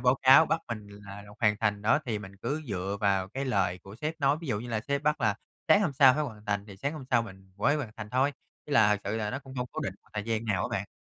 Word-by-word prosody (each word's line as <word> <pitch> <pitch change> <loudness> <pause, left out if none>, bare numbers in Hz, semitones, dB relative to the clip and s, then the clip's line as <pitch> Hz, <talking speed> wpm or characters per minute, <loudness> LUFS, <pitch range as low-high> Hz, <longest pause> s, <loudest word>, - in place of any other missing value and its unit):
báo 125 +1 +4
cáo 135 +5 +8
bắt 165 - 0
mình 110 -3 -5
thì - - -12
là 100 +1 -8
rồi 105 0 -14
hoàn 105 -3 +3
thành 105 -2 0
đó, 110 +7 +4
thì 110 -3 -1
mình 100 -1 -10
cứ 150 +10 -3
dựa 95 0 -2
vào 95 -2 +1
cái 135 +7 -4
lời 95 -8 0
của 100 +1 -11
sếp 155 +6 -3
nói, 140 +1 +3
ví 165 - -7
dụ 105 -3 0
như 120 - -7
là 115 -2 -1
sếp 140 +4 -2
bắt 150 +1 +1
là 105 - +2 0.3
sáng 205 - +7
hôm 175 -8 +1
sau 130 -1 +7
phải 150 - 0
hoàn 110 -7 -7
thành 100 -1 -1
thì 100 -3 -11
sáng 140 +9 -2
hôm 150 -4 -7
sau 120 -2 +4
mình 95 -3 -12
mới 145 +8 +2
hoàn 135 -7 -4
thành 110 -1 -7
thôi, 130 +4 +2 0.3
với 150 - -5
là 105 -6 +5
thực - - -13
sự 105 +3 -2
là 105 -1 -2
nó 130 - -3
cũng 135 -1 -12
hông 125 -1 -2
cố - - -4
định 95 - -3
một - - -27
thời 105 - -3
gian 115 -1 -1
nào 100 -5 0
á - - -2
bạn. - - -6
110 Hz, 315 wpm, -29 LUFS, 100-135 Hz, 0.3 s, cáo